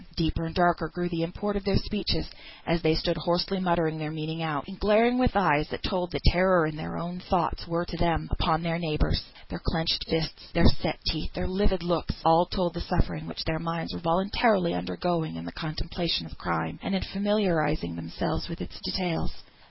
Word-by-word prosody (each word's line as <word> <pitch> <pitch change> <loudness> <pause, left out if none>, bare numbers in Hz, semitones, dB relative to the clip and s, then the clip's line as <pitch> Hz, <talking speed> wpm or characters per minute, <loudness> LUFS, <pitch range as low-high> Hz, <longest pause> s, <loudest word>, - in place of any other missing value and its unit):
Deeper 165 -1 0
and 165 - -8
darker 175 -3 +3
grew 175 +2 -2
the 170 -1 -2
import 205 +5 -2
of 200 - -2
their 195 -1 +2
speeches, 190 -6 -1 0.4
as 165 0 +1
they 160 0 +4
stood 170 0 0
hoarsely 175 +4 +1
muttering 170 -3 +1
their 155 -1 -3
meaning 160 +1 -4
out, 155 -3 -2
and 195 -1 -9
glaring, 225 +5 +4
with 255 - +3
eyes 150 -6 +4
that - - -6
told 180 -3 -1
the - - -3
terror 175 -3 +4
their 155 0 -6
own 175 +2 -5
thoughts 180 -3 0
were 170 +1 -1
to 170 - -6
them, 165 -2 +1
upon 160 -1 +1
their 165 0 0
neighbours. 155 -3 0 0.3
Their - - -6
clenched 165 0 +1
fists, 160 -1 -2
their - - +4
set - - +2
teeth, 155 - -1
their - - -2
livid 190 -1 0
looks, 175 -2 0
all 165 +2 +6
told 180 -3 -1
the 170 - -4
suffering 160 -3 -2
their 160 -1 -1
minds 165 0 -3
were - - -4
voluntarily 185 +2 +2
undergoing 155 - -1
in 80 0 -6
the 85 - -6
contemplation 165 - -2
of 80 - -11
crime, 80 -1 -2
and 195 - -1
in 190 - 0
familiarising 175 - +1
themselves 85 0 -3
with - - -6
its - - -7
details. 175 -3 -2
170 Hz, 195 wpm, -28 LUFS, 160-185 Hz, 0.4 s, all